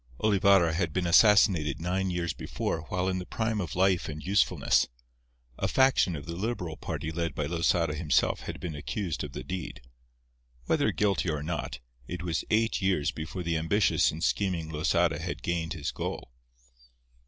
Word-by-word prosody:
Olivarra 100 Hz, -5 st, +4 dB
had 85 Hz, -2 st, -1 dB
been 90 Hz, -1 st, 0 dB
assassinated 90 Hz, -, +5 dB
nine 95 Hz, +3 st, -1 dB
years 85 Hz, -2 st, -2 dB
before 80 Hz, -1 st, -3 dB
while 90 Hz, 0 st, -1 dB
in 95 Hz, -1 st, 0 dB
the 90 Hz, -, -6 dB
prime 110 Hz, -2 st, -1 dB
of 85 Hz, -5 st, -5 dB
life 95 Hz, -2 st, +2 dB
and 75 Hz, 0 st, -7 dB
usefulness. 100 Hz, +2 st, +2 dB, 0.7 s
A -, -, +1 dB
faction 130 Hz, -9 st, +3 dB
of 70 Hz, -, -7 dB
the 85 Hz, 0 st, -5 dB
Liberal 90 Hz, -5 st, -3 dB
party 80 Hz, -, -4 dB
led 85 Hz, -2 st, -3 dB
by -, -, -1 dB
Losada 85 Hz, -1 st, +1 dB
himself 75 Hz, 0 st, +1 dB
had -, -, -7 dB
been 85 Hz, -3 st, -5 dB
accused 85 Hz, +3 st, -3 dB
of -, -, -7 dB
the -, -, -6 dB
deed. 90 Hz, +5 st, -5 dB, 0.9 s
Whether -, -, +2 dB
guilty 100 Hz, -4 st, +1 dB
or 75 Hz, -2 st, -2 dB
not, 80 Hz, -3 st, -4 dB, 0.3 s
it 90 Hz, 0 st, -5 dB
was 85 Hz, -3 st, -1 dB
eight 110 Hz, 0 st, +1 dB
years 85 Hz, -6 st, +1 dB
before 80 Hz, +3 st, -6 dB
the 85 Hz, -1 st, 0 dB
ambitious 80 Hz, +3 st, +2 dB
and 80 Hz, +2 st, -5 dB
scheming 90 Hz, -6 st, 0 dB
Losada 75 Hz, 0 st, +1 dB
had -, -, -5 dB
gained 85 Hz, -1 st, -1 dB
his 75 Hz, -5 st, -3 dB
goal. -, -, -5 dB
85 Hz, 170 wpm, -28 LUFS, 80-95 Hz, 0.9 s, assassinated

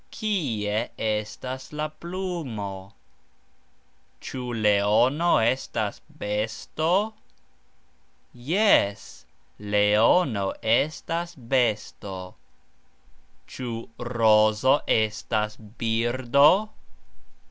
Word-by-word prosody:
Kie 120 Hz, -, -2 dB
estas 110 Hz, +5 st, -4 dB
la 150 Hz, 0 st, -3 dB
plumo? 155 Hz, -, -6 dB, 1.3 s
Cxu 130 Hz, -, -7 dB, 0.2 s
leono 110 Hz, +10 st, +3 dB
estas 120 Hz, +4 st, -1 dB, 0.2 s
besto? 155 Hz, -, -1 dB, 1.2 s
Jes, 125 Hz, -, +1 dB, 0.3 s
leono 105 Hz, -, +2 dB
estas 155 Hz, +8 st, 0 dB
besto. 110 Hz, -7 st, -2 dB, 1.1 s
Cxu 115 Hz, -3 st, -6 dB
rozo 115 Hz, +1 st, +3 dB
estas 110 Hz, 0 st, 0 dB, 0.2 s
birdo? 120 Hz, +5 st, +3 dB
115 Hz, 55 wpm, -25 LUFS, 105-145 Hz, 1.3 s, leono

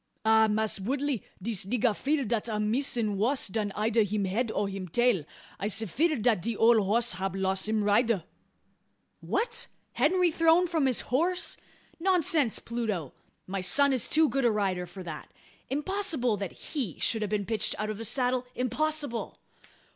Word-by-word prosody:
"Ah, 220 Hz, 0 st, +5 dB
Mass' 215 Hz, -1 st, 0 dB
Woodley, 265 Hz, +3 st, -2 dB, 0.2 s
dis 215 Hz, 0 st, -1 dB
nigga 230 Hz, +1 st, +1 dB
fear 285 Hz, +3 st, 0 dB
dat 230 Hz, +1 st, -1 dB
am 210 Hz, -1 st, -1 dB
missin' 235 Hz, -5 st, 0 dB
wuss 255 Hz, +5 st, +1 dB
dan 210 Hz, 0 st, -2 dB
eider 220 Hz, +2 st, +2 dB
him 205 Hz, -1 st, 0 dB
head 220 Hz, +6 st, -1 dB
or 205 Hz, -1 st, -1 dB
him 195 Hz, -1 st, -6 dB
tail. 240 Hz, -3 st, +2 dB, 0.4 s
I'se 210 Hz, +2 st, +1 dB
feer'd 275 Hz, -, 0 dB
dat 225 Hz, -7 st, +3 dB
de 230 Hz, +3 st, -2 dB
ole 225 Hz, -2 st, +5 dB
hoss 230 Hz, +3 st, +3 dB
hab 195 Hz, 0 st, -2 dB
loss 190 Hz, +1 st, 0 dB
him 215 Hz, -1 st, 0 dB
rider!" 210 Hz, -2 st, +2 dB, 1.0 s
"What! 470 Hz, 0 st, -2 dB, 0.3 s
Henry 360 Hz, -2 st, +2 dB
thrown 330 Hz, +2 st, +4 dB
from 325 Hz, -6 st, +1 dB
his 255 Hz, -, +2 dB
horse? 350 Hz, +8 st, 0 dB, 0.4 s
Nonsense, 335 Hz, -, +2 dB
Pluto! 215 Hz, -, -4 dB, 0.3 s
My 195 Hz, 0 st, -4 dB
son 280 Hz, +8 st, +3 dB
is 255 Hz, -, +1 dB
too 315 Hz, 0 st, +4 dB
good 275 Hz, -1 st, -1 dB
a 240 Hz, -, +4 dB
rider 190 Hz, -4 st, -1 dB
for 190 Hz, +1 st, -10 dB
that. 160 Hz, -3 st, -8 dB, 0.4 s
Impossible 300 Hz, -, 0 dB
that 195 Hz, -3 st, -5 dB
he 250 Hz, -, -4 dB
should 225 Hz, -, +2 dB
have 210 Hz, -, -2 dB
been 205 Hz, -1 st, -1 dB
pitched 215 Hz, -1 st, -1 dB
out 215 Hz, 0 st, -2 dB
of 215 Hz, -, -7 dB
the -, -, -5 dB
saddle 250 Hz, +1 st, +1 dB
impossible!" 285 Hz, +1 st, -2 dB
230 Hz, 170 wpm, -28 LUFS, 205-275 Hz, 1.0 s, Ah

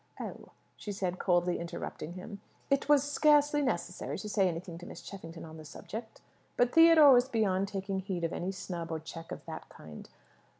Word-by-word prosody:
"Oh," -, -, -7 dB, 0.3 s
she 210 Hz, -, -6 dB
said, 185 Hz, -2 st, -3 dB
coldly 175 Hz, -1 st, +2 dB
interrupting 170 Hz, -1 st, -6 dB
him; 195 Hz, +3 st, -9 dB, 0.3 s
"it 275 Hz, +1 st, +1 dB
was 290 Hz, -2 st, +6 dB
scarcely 295 Hz, 0 st, +4 dB
necessary 180 Hz, -9 st, -2 dB
to 210 Hz, -, -6 dB
say 195 Hz, -2 st, +3 dB
anything 170 Hz, 0 st, -5 dB
to 175 Hz, -, -10 dB
Miss -, -, -9 dB
Cheffington 165 Hz, -5 st, -9 dB
on 160 Hz, 0 st, -10 dB
the 155 Hz, -, -10 dB
subject." 220 Hz, +9 st, -8 dB, 0.4 s
But 245 Hz, 0 st, +3 dB
Theodore 325 Hz, -4 st, +8 dB
was 245 Hz, +1 st, +4 dB
beyond 200 Hz, -5 st, +1 dB
taking 195 Hz, -1 st, -3 dB
heed 185 Hz, -2 st, -4 dB
of 165 Hz, -, -1 dB
any 185 Hz, +2 st, -2 dB
snub 175 Hz, -3 st, -6 dB
or 160 Hz, -, -2 dB
check 165 Hz, +1 st, -9 dB
of -, -, -7 dB
that -, -, -8 dB
kind. 75 Hz, -1 st, -12 dB
190 Hz, 185 wpm, -31 LUFS, 170-245 Hz, 0.4 s, Theodore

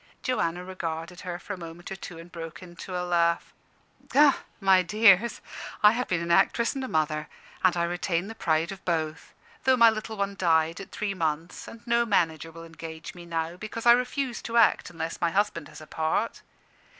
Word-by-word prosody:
Joanna 180 Hz, -8 st, -1 dB
regarded 170 Hz, -1 st, -5 dB
her 180 Hz, -1 st, -5 dB
for 205 Hz, -, -7 dB
a 190 Hz, -, -8 dB
moment 170 Hz, +1 st, -9 dB
or -, -, -3 dB
two 180 Hz, -3 st, -9 dB
and 165 Hz, +1 st, -12 dB
broke 165 Hz, +1 st, -8 dB
into 180 Hz, +1 st, -7 dB
a 180 Hz, -, -2 dB
laugh. 170 Hz, -1 st, +1 dB, 1.1 s
"My 190 Hz, -2 st, +5 dB
dears, 210 Hz, +3 st, +4 dB, 0.4 s
I 210 Hz, -, +9 dB
have 245 Hz, +3 st, -2 dB
been 175 Hz, -2 st, 0 dB
an 170 Hz, -, -2 dB
actress 200 Hz, +6 st, +3 dB
and 270 Hz, -1 st, -4 dB
a -, -, -3 dB
mother. 155 Hz, -4 st, 0 dB, 0.4 s
I 175 Hz, -2 st, +3 dB
retain 175 Hz, 0 st, -1 dB
the 225 Hz, -, -7 dB
pride 165 Hz, -4 st, 0 dB
of 195 Hz, -1 st, -9 dB
both, 160 Hz, -2 st, -2 dB, 0.3 s
though 260 Hz, -1 st, +4 dB
my 230 Hz, -1 st, +7 dB
little 220 Hz, 0 st, -5 dB
one 200 Hz, 0 st, -1 dB
died 165 Hz, -2 st, +2 dB
at 195 Hz, -, -10 dB
three 210 Hz, -2 st, -2 dB
months, 165 Hz, -2 st, -3 dB
and 230 Hz, +1 st, -12 dB
no 235 Hz, 0 st, +3 dB
manager 165 Hz, -7 st, +1 dB
will 165 Hz, +1 st, -10 dB
engage 160 Hz, -1 st, -9 dB
me 175 Hz, -1 st, -11 dB
now, 165 Hz, +1 st, -3 dB
because 215 Hz, +4 st, -6 dB
I 235 Hz, -, +9 dB
refuse 250 Hz, +1 st, +1 dB
to 235 Hz, 0 st, -2 dB
act 230 Hz, -, +4 dB
unless 165 Hz, 0 st, -5 dB
my 170 Hz, -, +3 dB
husband 190 Hz, -4 st, 0 dB
has -, -, -12 dB
a -, -, -10 dB
part. 160 Hz, +9 st, -1 dB
175 Hz, 195 wpm, -27 LUFS, 165-210 Hz, 1.1 s, I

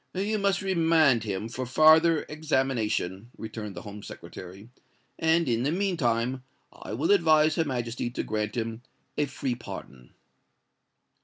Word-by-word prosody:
"You 210 Hz, +3 st, 0 dB
must 200 Hz, 0 st, +1 dB
remand 160 Hz, -, +3 dB
him 100 Hz, +1 st, -3 dB
for 120 Hz, +3 st, -5 dB
farther 155 Hz, +4 st, +5 dB
examination," 130 Hz, -, -1 dB
returned 110 Hz, -2 st, -7 dB
the -, -, -7 dB
Home 105 Hz, 0 st, -9 dB
Secretary; 95 Hz, +1 st, -10 dB, 0.5 s
"and 160 Hz, +1 st, +3 dB
in 115 Hz, -1 st, +1 dB
the 140 Hz, +4 st, 0 dB
mean 190 Hz, +1 st, 0 dB
time 125 Hz, -2 st, 0 dB, 0.3 s
I -, -, -8 dB
will 145 Hz, -, +1 dB
advise 155 Hz, -5 st, +5 dB
Her 165 Hz, 0 st, 0 dB
Majesty 120 Hz, -3 st, -3 dB
to 120 Hz, -, -4 dB
grant 105 Hz, -1 st, -2 dB
him 115 Hz, 0 st, -3 dB, 0.3 s
a 150 Hz, -, 0 dB
free 130 Hz, -1 st, -3 dB
pardon." 65 Hz, -, -10 dB
130 Hz, 145 wpm, -27 LUFS, 110-160 Hz, 0.5 s, farther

